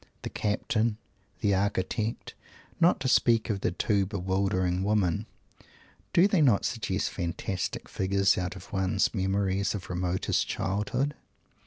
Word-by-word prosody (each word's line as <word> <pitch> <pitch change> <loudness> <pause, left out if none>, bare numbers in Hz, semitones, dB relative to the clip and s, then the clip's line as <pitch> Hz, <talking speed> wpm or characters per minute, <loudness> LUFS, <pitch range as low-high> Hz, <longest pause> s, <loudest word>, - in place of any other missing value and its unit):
"The - - -5
Captain," 110 +1 0 0.4
"the 100 -1 +2
Architect" 100 +3 -1 0.5
not 170 +2 +4
to 135 - 0
speak 115 -3 +3
of 100 -2 -3
the - - +1
two 100 +2 +1
bewildering 95 -2 0
women 100 0 +1 0.8
do 175 - +5
they 195 -5 +2
not 120 -9 +4
suggest - - -1
fantastic 90 +2 -3
figures 95 +1 +2
out 90 0 -3
of 95 - -12
one's 95 +1 +1
memories 95 0 0
of 95 -2 -6
remotest 90 +1 0
childhood? 105 +9 -1
100 Hz, 130 wpm, -28 LUFS, 95-110 Hz, 0.8 s, do